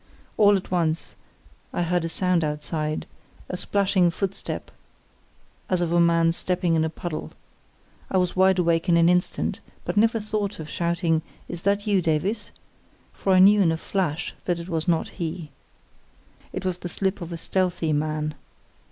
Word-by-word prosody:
All 205 -1 +6
at 185 - -8
once 165 -3 +1 0.6
I 175 - -1
heard 175 0 0
a 165 - -2
sound 180 0 +1
outside, 155 +1 -2 0.4
a - - -3
splashing 190 -1 +2
footstep 195 +2 -4 1.0
as 185 - +2
of 175 -1 0
a 175 - +3
man 165 -1 +4
stepping 180 0 0
in 160 -1 +3
a 160 - 0
puddle. 165 0 -6 0.8
I 190 - +1
was 180 -1 +1
wide 190 0 +4
awake 170 0 +2
in 170 - +5
an 170 0 +5
instant, 180 0 0 0.3
but - - -3
never 225 +2 +4
thought 210 -2 -3
of 155 - -6
shouting 170 -1 +1 0.3
"Is 175 -1 -6
that 200 +1 +1
you, 200 -3 +3
Davies?" 180 +7 -1 0.6
for 195 - +1
I - - +6
knew 200 +3 +7
in 170 -4 +4
a 160 - -1
flash 175 -2 -2
that 175 -2 0
it 170 +1 -7
was 165 -1 -2
not 165 -2 +2
he. 165 -3 -5 1.0
It - - -5
was 180 -1 -1
the 175 - -5
slip 190 +2 -1
of 170 0 -6
a 170 - -4
stealthy 175 -2 0
man. 155 0 -1
175 Hz, 170 wpm, -25 LUFS, 165-190 Hz, 1.0 s, knew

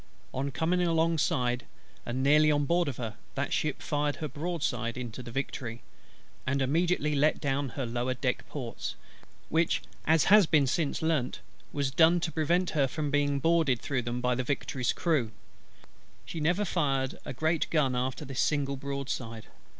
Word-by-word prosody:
On 135 +2 -1
coming 165 +6 +1
alongside 160 -7 +1 0.4
and 125 +2 -1
nearly 150 +2 +5
on 145 -1 +2
board 170 +3 +2
of 135 - -3
her, 115 -4 -5 0.2
that - - -1
ship 150 -3 -1
fired 145 -1 0
her 155 - -4
broadside 145 -8 -2
into 125 -1 -5
the 120 - -9
Victory, 120 -2 -4 0.6
and 140 +1 +1
immediately 150 +3 +1
let 150 +2 +3
down 140 -1 -1
her 135 +1 -4
lower 120 +2 -1
deck 125 -1 -1
ports; 125 -6 -5 0.5
which, 165 +1 +2 0.2
as 160 -1 +4
has 205 -3 +6
been 150 -3 +4
since 145 +3 -1
learnt, 155 -6 0 0.3
was 140 -2 -1
done 165 +4 +5
to 165 - -1
prevent 170 +4 +1
her 145 -3 +2
from 150 +1 -3
being 145 -1 +2
boarded 160 -5 +3
through 135 -3 -1
them 120 +1 -3
by 125 0 +2
the 130 +1 -1
Victory's 130 -1 -1
crew. 155 -10 +1 1.0
She 165 - -5
never 175 +7 +2
fired 135 -7 0
a - - -6
great 160 +5 0
gun 140 -6 +2
after 130 +4 -2
this 135 -2 -5
single 140 -2 +1
broadside. 130 -5 -4
140 Hz, 165 wpm, -29 LUFS, 130-160 Hz, 1.0 s, has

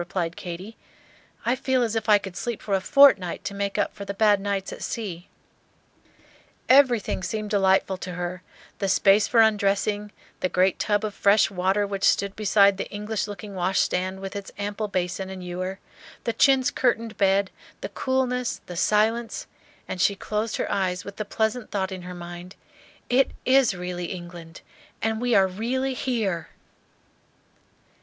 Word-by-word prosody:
replied 175 -1 -3
Katy. 185 +5 -8 0.7
"I 240 - +2
feel 260 -1 +1
as 225 -1 -1
if 225 - -2
I 210 - +8
could 195 -2 -8
sleep 235 +1 -4
for 205 - -3
a 190 - +2
fortnight 200 -8 +5
to 205 - -3
make 200 0 -2
up - - 0
for 200 - -8
the 200 0 -5
bad 205 -1 +4
nights 195 -1 -2
at - - -10
sea." 185 -6 -5 1.4
Everything 250 -7 +4
seemed 210 +2 -4
delightful 190 -1 +2
to 180 -1 -6
her, 175 0 -4 0.4
the 195 - 0
space 200 +2 +4
for 235 -2 +4
undressing, 205 -1 +1 0.3
the 185 - 0
great 185 +1 +2
tub 205 0 +1
of 210 - -4
fresh 205 +1 +3
water 190 +2 +1
which 195 -1 -5
stood 200 0 +2
beside 200 -2 +4
the - - -4
English 210 +1 -3
looking 205 0 -8
washstand 185 0 0
with 195 +1 -6
its 200 -1 -6
ample 205 +1 -3
basin 185 0 -2
and 190 -1 -7
ewer, 185 +2 -4 0.5
the 230 - -1
chintz 265 +2 +4
curtained 230 -3 0
bed, 195 0 +2 0.3
the - - -4
coolness, 250 -2 -1
the 180 - -8
silence, 220 +5 +1 0.4
and 180 - -4
she 200 - +3
closed 215 +2 -2
her - - -2
eyes 185 -2 -1
with 200 - -9
the 215 - -3
pleasant 220 +3 -1
thought 195 -2 -2
in 185 -1 -6
her 180 0 -8
mind, 175 +1 -9 0.5
"It 265 +2 +3 0.2
is 260 -5 +4
really 180 0 -4
England 175 -2 -8 0.4
and 220 0 -1
we 245 -1 +2
are 195 - +6
really 245 +8 -2
here!" 215 - -2
200 Hz, 165 wpm, -25 LUFS, 185-220 Hz, 1.4 s, I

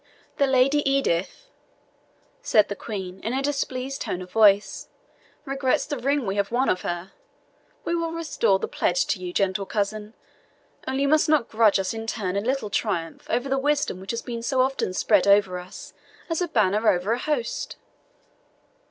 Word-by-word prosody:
"The 280 - +3
Lady 265 +2 +3
Edith," 270 - 0 1.0
said 215 - +3
the 200 - -3
Queen, 190 -4 -6
in 225 +5 -3
a 270 +1 -1
displeased 275 -1 -2
tone 180 0 -3
of 180 - -14
voice, 205 -1 +3 0.6
"regrets 270 -2 0
the 290 - -4
ring 275 +1 0
we 195 0 -2
have 200 +1 0
won 255 +3 +1
of 185 - +1
her. 175 +2 -4 0.7
We - - -1
will 335 -1 -1
restore 325 -12 +1
the - - -4
pledge 180 0 0
to 195 - -1
you, 180 -1 -5
gentle 195 +1 0
cousin; 210 +1 -3 0.7
only 265 +1 0
you - - +2
must 305 +1 +3
not 300 -7 +2
grudge 220 -2 +4
us 190 +1 -2
in 225 0 -6
turn 195 -4 -2
a 200 - +1
little 245 -2 -2
triumph 175 -7 -2
over 245 +3 0
the 270 0 0
wisdom 290 -8 0
which 190 +1 -11
has 230 +2 -3
been 235 -2 -5
so 255 +2 +1
often 265 -6 0
spread 205 -1 +3
over 200 -2 +4
us, 180 +1 -11 0.4
as 330 - 0
a 355 - 0
banner 215 - +2
over 180 +4 +1
a 235 - +1
host." 270 -5 -2
225 Hz, 180 wpm, -24 LUFS, 195-270 Hz, 1.0 s, grudge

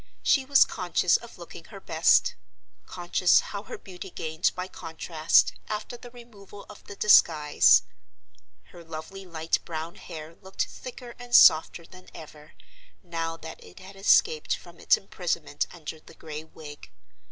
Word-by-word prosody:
She 270 -2 +2
was 280 0 +5
conscious - - 0
of - - -14
looking - - -12
her - - -12
best; - - +2 0.5
conscious 175 0 +2
how 200 - -6
her - - -9
beauty 190 0 -10
gained 160 -1 -2
by 180 0 -5
contrast, 160 -2 +1 0.2
after 215 +3 -5
the 245 0 -12
removal 215 -5 -14
of 210 - -14
the 200 - -10
disguise. 155 - +5 0.9
Her 175 -1 -13
lovely 165 +4 -9
light 165 -1 -1
brown 165 0 -6
hair 155 0 -10
looked 190 0 -3
thicker 250 -1 -10
and 245 0 -2
softer 160 +1 +6
than 185 +2 -16
ever, 150 -1 -13 0.5
now 165 -2 -4
that 160 0 -11
it 90 - -16
had 195 +1 -13
escaped 160 -5 +2
from 170 -1 -16
its - - +3
imprisonment 170 -6 -4
under 160 -2 -9
the - - -18
gray 155 0 -8
wig. 150 -2 -12
170 Hz, 150 wpm, -26 LUFS, 160-200 Hz, 0.9 s, softer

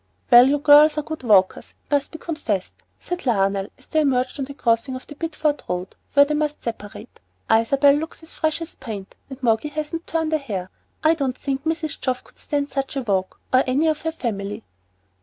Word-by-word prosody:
"Well, 240 +1 +9
you 290 - +3
girls 295 +1 +6
are 300 - 0
good 315 +1 -6
walkers, 200 -6 +2
it - - -33
must 285 -1 +1
be 320 - -7
confessed;" 235 - -3 0.3
said 355 0 -5
Lionel, 195 -3 +1
as - - -18
they 315 - 0
emerged 260 -1 0
on 270 - -1
the 280 +1 -10
crossing 235 +1 +1
of 255 - -8
the - - -10
Bideford 305 -1 -1
road 180 +1 -3 0.2
where 285 0 +7
they 300 - -2
must 300 0 -1
separate. 215 -3 -7 0.3
"Isabel 275 +6 +5
looks 320 +3 -4
as 320 - -8
fresh 315 +1 -1
as 330 - -9
paint, 215 -7 -8
and 265 0 -10
Moggy 225 +4 +2
hasn't 310 +3 -5
turned 320 -1 -1
a 310 - +2
hair. 195 -9 -5 0.3
I 315 +1 +5
don't 270 -5 -2
think 275 0 -3
Mrs. 320 -1 -2
Geoff 255 -1 -1
could - - -21
stand 285 -1 -2
such 275 0 -3
a 270 - -2
walk, 190 -4 -1
or 255 - +6
any 270 +5 +2
of 310 -1 +1
her 325 - -2
family." 205 -9 -4
280 Hz, 210 wpm, -22 LUFS, 230-310 Hz, 0.3 s, Well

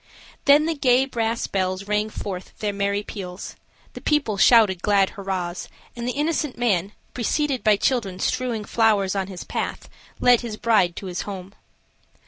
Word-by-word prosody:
Then 290 +2 +6
the 330 - 0
gay 260 -3 +3
brass 230 -3 -1
bells 185 0 -2
rang 210 +1 0
forth 190 -3 -7
their 210 -1 -2
merry 200 +1 -1
peals, 185 -3 -7 0.4
the - - -9
people 295 -8 +1
shouted 200 -3 +5
glad 200 -1 +3
hurrahs, 185 -3 -4 0.3
and 240 0 -5
the 250 - -1
innocent 300 -2 -1
man, 200 -5 0 0.2
preceded 265 +2 -1
by 215 -2 +5
children 205 -6 0
strewing 240 0 -1
flowers 205 -4 +2
on 190 -1 -1
his 185 -3 -7
path, - - -4 0.3
led 245 -1 +5
his 225 -3 -6
bride 210 -8 +2
to - - -7
his 180 -1 -4
home. 195 -1 -7
210 Hz, 160 wpm, -23 LUFS, 190-245 Hz, 0.4 s, Then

